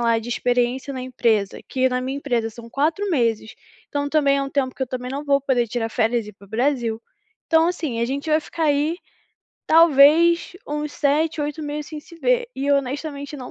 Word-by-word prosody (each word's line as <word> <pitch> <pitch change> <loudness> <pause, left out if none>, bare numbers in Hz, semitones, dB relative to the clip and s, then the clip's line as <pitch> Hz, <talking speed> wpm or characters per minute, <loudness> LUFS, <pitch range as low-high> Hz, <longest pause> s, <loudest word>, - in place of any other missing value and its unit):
lá 230 -1 +2
de 225 +1 -8
experiência 245 +2 0
na 260 - -5
empresa, 230 -6 0
que 260 0 +1
na 250 0 -1
minha 265 +2 -3
empresa 240 -5 -1
são 230 +1 -12
4 320 - 0
meses, 230 -6 0 0.3
então 285 0 -2
também 285 -2 +3
é - - 0
um 275 - -4
tempo 265 -2 -1
que - - -4
eu 260 - -1
também 250 -1 -5
não 285 +2 -4
vou 280 -1 +3
poder 255 -4 +1
tirar 225 0 -2
férias 230 -1 0
e - - -8
ir - - -21
para 200 - -17
o - - -24
Brasil. 235 -2 0 0.5
Então 325 0 +4
assim, 310 -10 -3
a - - +2
gente 275 +4 -4
já 310 - 0
vai 310 - +4
ficar 325 +1 -4
aí, 295 +2 +1 0.7
talvez 330 +2 +5
uns 300 0 -3
7, 305 +3 +1
8 295 +1 -3
meses 295 0 -4
sem 310 -1 -7
se 335 - -16
ver, - - +1
e 280 +1 -1
honestamente 280 +1 -2
não 250 -2 -8
275 Hz, 220 wpm, -22 LUFS, 245-300 Hz, 0.7 s, talvez